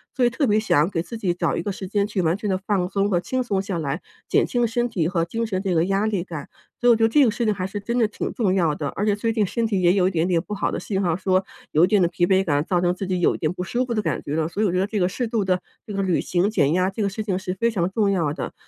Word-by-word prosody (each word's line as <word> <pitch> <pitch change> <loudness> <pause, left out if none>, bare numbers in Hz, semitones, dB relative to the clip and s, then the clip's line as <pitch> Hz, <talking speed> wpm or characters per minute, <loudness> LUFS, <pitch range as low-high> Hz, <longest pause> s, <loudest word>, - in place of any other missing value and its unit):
所 255 - +3
以 240 - +4
特 265 +4 0
别 210 -1 +3
想 165 -6 +2
给 165 -4 -1
自 230 +4 -7
己 185 -5 0
找 170 -4 -1
一 - - -1
个 205 - -3
时 190 - -7
间 205 +1 0
去 210 -3 -1
完 170 +2 +1
全 205 0 -3
地 190 - +1
放 190 -2 -1
松 200 0 0
和 180 - +2
轻 255 +8 -2
松 200 -5 -1
下 195 -2 -3
来， 150 0 -3 0.3
减 - - +3
轻 240 -1 +1
身 240 +2 0
体 175 -8 0
和 170 -3 0
精 230 +6 -2
神 190 -4 -2
这 190 -3 -1
个 165 - +3
压 195 +2 +1
力 205 -5 0
感， 155 -6 -7 0.3
所 245 - +1
以 - - +8
我 230 - +6
觉 225 - 0
得 225 - +5
这 285 +4 +5
个 225 - +3
事 235 - -2
情 215 - +2
还 185 -1 -3
是 205 +1 -5
真 235 +4 -1
的 225 - +4
挺 210 - -5
重 200 -6 +1
要 165 -5 +2
的。 145 -1 -3
而 205 - -3
且 210 - +3
最 225 +2 -1
近 215 -3 +2
身 230 +4 -1
体 195 -4 0
也 175 - +5
有 185 -2 +3
一 - - 0
点 165 -2 +1
点 175 -3 +2
不 210 +4 -7
好 195 - -1
的 - - -3
信 195 -2 -2
号， 170 -2 +1
说 185 0 +1 0.3
有 155 - +4
一 180 - +6
定 205 -2 +4
的 175 - +4
疲 175 +1 +1
惫 190 +1 +2
感 145 -2 +1
造 175 +2 0
成 175 0 +1
自 195 - -4
己 185 -1 -1
有 175 - +3
一 - - -5
点 155 0 -1
不 180 - -6
舒 245 +7 -1
服 240 - -3
的 215 - 0
感 - - -2
觉 145 - -4
了， 160 - +1
所 200 +6 -2
以 - - +3
我 190 - +1
觉 180 - 0
得 195 - +1
这 215 -1 -2
个 180 0 +2
适 245 +5 -2
度 225 -2 0
的 185 -1 0 0.2
这 210 - -7
个 195 - -1
旅 185 -4 +1
行、 180 +3 +1
减 145 -10 +2
压， 185 +1 +2
这 195 +3 -5
个 200 - +1
事 215 +2 -5
情 190 -4 0
是 185 -1 -3
非 230 +5 +1
常 180 -5 0
重 205 -1 +1
要 165 -7 +1
的。 - - -5
195 Hz, 375 characters per minute, -23 LUFS, 175-215 Hz, 0.3 s, 以